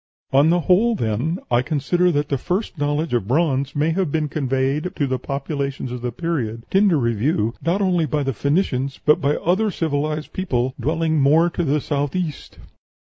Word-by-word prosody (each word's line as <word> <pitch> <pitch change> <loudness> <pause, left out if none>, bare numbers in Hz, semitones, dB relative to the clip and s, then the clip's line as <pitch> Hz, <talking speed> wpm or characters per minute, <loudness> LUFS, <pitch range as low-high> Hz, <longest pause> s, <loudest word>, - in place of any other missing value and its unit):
On 140 +4 +5
the 175 +1 +3
whole, 210 +8 +3
then, 125 - -1
I 120 0 +4
consider 165 +6 +1
that 145 -2 -1
the 140 - 0
first 185 - -2
knowledge 145 +1 -1
of 115 -5 0
bronze 140 -1 +1
may 150 +3 +1
have 180 -2 -1
been 155 -1 0
conveyed 135 +4 -1
to 145 - 0
the 130 -1 -2
populations 140 -1 -4
of 125 -1 -5
the 125 0 -2
period 120 -6 -3
under 195 -3 +4
review 115 -1 0
not 180 +5 +1
only 175 -4 +1
by 150 -1 -1
the 135 -1 -1
Phoenicians, 140 - -1
but 150 - +4
by 145 +2 +2
other 195 +6 +1
civilized 155 -3 -2
people 130 -9 -1
dwelling 160 +3 0
more 160 +5 +4
to 175 - -2
the 150 -1 +1
south 145 0 -2
east." 170 -6 -4
150 Hz, 185 wpm, -21 LUFS, 135-170 Hz, -, On